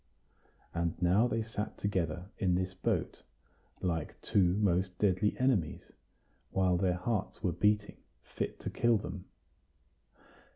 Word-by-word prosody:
And 85 0 -1
now 95 +6 +4
they 115 -2 -1
sat 110 -1 -4
together 90 -2 -2
in 90 -4 +2
this 95 +1 -1
boat, - - -1 0.6
like 85 -4 -2
two 90 -3 +3
most 90 -2 +1
deadly 100 +1 +2
enemies, 125 -11 0 0.6
while 95 -2 +2
their 90 0 +1
hearts 105 +3 -2
were 90 - +2
beating 105 +3 +1 0.3
fit - - -4
to - - -4
kill 120 -1 +3
them. 95 -2 -6
95 Hz, 125 wpm, -32 LUFS, 90-105 Hz, 0.6 s, now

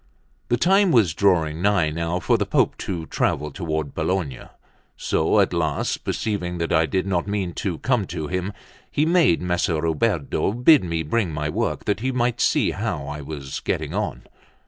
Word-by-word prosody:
The 120 - +2
time 190 - +4
was 110 - +4
drawing 80 -5 +2
nigh 95 -6 +2
now 85 +2 -2
for - - +2
the - - 0
Pope - - +2
to 85 -4 -4
travel 75 -1 -1
toward 80 -3 -3
Bologna; 80 -5 -2 0.5
so - - +1
at - - +2
last, - - -1
perceiving 90 -5 -2
that 85 0 -1
I 80 -1 +3
did 95 +2 -1
not 95 -1 -1
mean 100 -4 -2
to 90 -5 -2
come 120 -4 0
to 80 - -4
him, 90 +4 -2 0.4
he 150 - +1
made 165 - +3
Messer 90 -2 0
Ruberto 85 +2 0
bid 125 +4 +5
me 85 -2 -2
bring 90 +4 0
my 75 0 -2
work, - - -2
that 100 0 0
he 130 +3 -1
might 120 -1 0
see - - +2
how 70 - -3
I 75 +1 -6
was 70 -2 -6
getting - - -3
on. - - -3
90 Hz, 180 wpm, -23 LUFS, 80-105 Hz, 0.5 s, bid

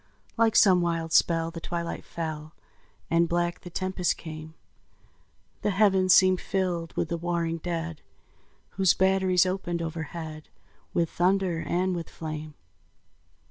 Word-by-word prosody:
Like 225 -1 +3
some 185 -3 +6
wild 165 -2 -1
spell 165 -1 +3
the 165 0 -8
twilight 170 0 -4
fell, 155 -2 -6 0.6
And 165 0 +3
black 175 0 0
the 180 - -9
tempest 185 0 -1
came; 155 -1 -9 1.1
The - - 0
heavens 195 -2 +3
seemed 185 -1 +5
filled 180 -4 -2
with 160 - 0
the 170 - -1
warring 170 -1 -2
dead, 165 -2 -4 0.7
Whose 190 -2 +3
batteries 190 -1 +3
opened 185 -2 -2
overhead 160 -1 -6 0.4
With 170 -1 0
thunder 185 -1 +1
and 180 +3 0
with 170 -2 -5
flame. 155 -1 -7
170 Hz, 130 wpm, -27 LUFS, 165-185 Hz, 1.1 s, some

